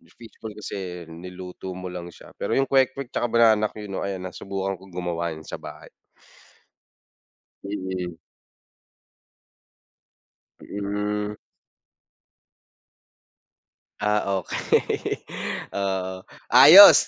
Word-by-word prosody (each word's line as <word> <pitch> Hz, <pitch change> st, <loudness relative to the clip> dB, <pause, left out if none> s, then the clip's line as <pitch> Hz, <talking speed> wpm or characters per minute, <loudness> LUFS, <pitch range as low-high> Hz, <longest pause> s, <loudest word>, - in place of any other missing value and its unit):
fish 115 Hz, -2 st, -14 dB
ball 110 Hz, -2 st, -7 dB
kasi 95 Hz, -4 st, -6 dB
niluto 90 Hz, +2 st, -8 dB
mo 90 Hz, 0 st, -6 dB
lang 85 Hz, -1 st, -7 dB
siya -, -, -14 dB
pero -, -, -2 dB
yung 135 Hz, 0 st, +2 dB
kwek-kwek 135 Hz, -1 st, +2 dB
saka -, -, -1 dB
banana 110 Hz, -2 st, +5 dB
que 105 Hz, -2 st, -8 dB
no 95 Hz, -, -3 dB
ayan 95 Hz, -2 st, -3 dB
nasubukan 95 Hz, +1 st, -4 dB
ko 95 Hz, -, -18 dB
gumawa 85 Hz, -2 st, -2 dB
niyan 80 Hz, 0 st, -11 dB
sa -, -, -4 dB
bahay. -, -, -11 dB, 1.8 s
Mm. 95 Hz, -3 st, -4 dB, 2.5 s
Mm. 105 Hz, +1 st, -3 dB, 2.7 s
Ah, 105 Hz, 0 st, +2 dB, 0.2 s
okey. -, -, -1 dB, 0.5 s
Oo. 95 Hz, -1 st, -2 dB, 0.2 s
Ayos 180 Hz, +9 st, +11 dB
95 Hz, 95 wpm, -25 LUFS, 90-105 Hz, 2.7 s, Ayos